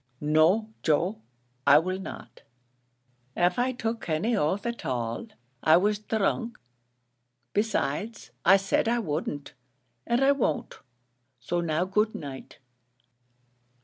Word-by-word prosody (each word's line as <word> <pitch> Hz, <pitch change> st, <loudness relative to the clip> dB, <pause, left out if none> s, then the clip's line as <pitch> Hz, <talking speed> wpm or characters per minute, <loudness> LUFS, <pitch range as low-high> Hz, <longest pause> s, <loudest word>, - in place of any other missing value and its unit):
"No, 160 Hz, +9 st, +3 dB
Joe, 175 Hz, +8 st, +1 dB, 0.5 s
I 140 Hz, -, +9 dB
will 185 Hz, +4 st, 0 dB
not; 190 Hz, -, -9 dB, 1.0 s
av 175 Hz, +3 st, +2 dB
I 250 Hz, +1 st, +2 dB
took 225 Hz, -5 st, -4 dB
any 175 Hz, +10 st, +1 dB
oath 195 Hz, +3 st, 0 dB
at 235 Hz, 0 st, -4 dB
all, 120 Hz, -, -3 dB, 0.3 s
I 160 Hz, +1 st, +6 dB
was 205 Hz, +3 st, +1 dB
dhrunk: 220 Hz, +2 st, -1 dB, 1.0 s
besides, 210 Hz, 0 st, -1 dB
I 195 Hz, -, +7 dB
said 195 Hz, +3 st, 0 dB
I 235 Hz, +1 st, +2 dB
wouldn't, 150 Hz, -7 st, -3 dB, 0.5 s
and 240 Hz, +3 st, +2 dB
I 275 Hz, -, +6 dB
won't; 255 Hz, -, -1 dB, 0.6 s
so 175 Hz, +9 st, -2 dB
now 170 Hz, +1 st, 0 dB
good 210 Hz, +3 st, +1 dB
night." 135 Hz, -3 st, -8 dB
190 Hz, 115 wpm, -27 LUFS, 155-225 Hz, 1.0 s, I